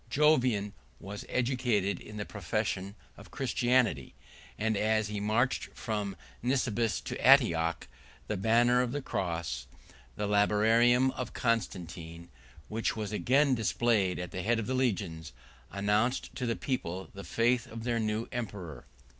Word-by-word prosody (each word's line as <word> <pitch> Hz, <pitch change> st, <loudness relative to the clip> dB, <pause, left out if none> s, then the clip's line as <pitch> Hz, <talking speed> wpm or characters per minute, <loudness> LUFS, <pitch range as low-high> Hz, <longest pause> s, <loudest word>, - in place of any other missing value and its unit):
Jovian 125 Hz, -8 st, +3 dB, 0.3 s
was 100 Hz, +2 st, -7 dB
educated 120 Hz, -6 st, 0 dB
in 105 Hz, -, -10 dB
the 105 Hz, -, -3 dB
profession 100 Hz, 0 st, -3 dB, 0.2 s
of -, -, -13 dB
Christianity; 125 Hz, -, +1 dB, 0.4 s
and 110 Hz, 0 st, 0 dB
as 110 Hz, +1 st, +1 dB
he 105 Hz, -1 st, -3 dB
marched 110 Hz, +5 st, +1 dB
from 105 Hz, -5 st, -3 dB, 0.3 s
Nisibis 120 Hz, -3 st, 0 dB
to -, -, -6 dB
Antioch, 80 Hz, 0 st, +4 dB, 0.4 s
the 105 Hz, -, -2 dB
banner 120 Hz, +5 st, +4 dB
of 125 Hz, 0 st, -2 dB
the 145 Hz, -, -2 dB
Cross, 85 Hz, -, -3 dB, 0.5 s
the 105 Hz, -, -2 dB
Labarum 115 Hz, +5 st, +4 dB
of 125 Hz, -2 st, -5 dB
Constantine, 85 Hz, -7 st, -3 dB, 0.4 s
which 110 Hz, +1 st, -1 dB
was 105 Hz, -2 st, -4 dB
again 135 Hz, +6 st, +3 dB
displayed 110 Hz, -4 st, +1 dB
at 90 Hz, 0 st, -5 dB
the 90 Hz, -, -4 dB
head 115 Hz, +5 st, +1 dB
of 115 Hz, -, -2 dB
the 130 Hz, -, -2 dB
legions, 95 Hz, -, -1 dB, 0.4 s
announced 105 Hz, +6 st, 0 dB
to 125 Hz, -, -2 dB
the 115 Hz, -, 0 dB
people 95 Hz, -8 st, -3 dB
the 100 Hz, -, -8 dB
faith 120 Hz, +3 st, +1 dB
of 115 Hz, 0 st, -8 dB
their 120 Hz, -1 st, 0 dB
new 110 Hz, +1 st, -1 dB
emperor. 95 Hz, -, -6 dB
110 Hz, 140 wpm, -30 LUFS, 100-120 Hz, 0.5 s, Antioch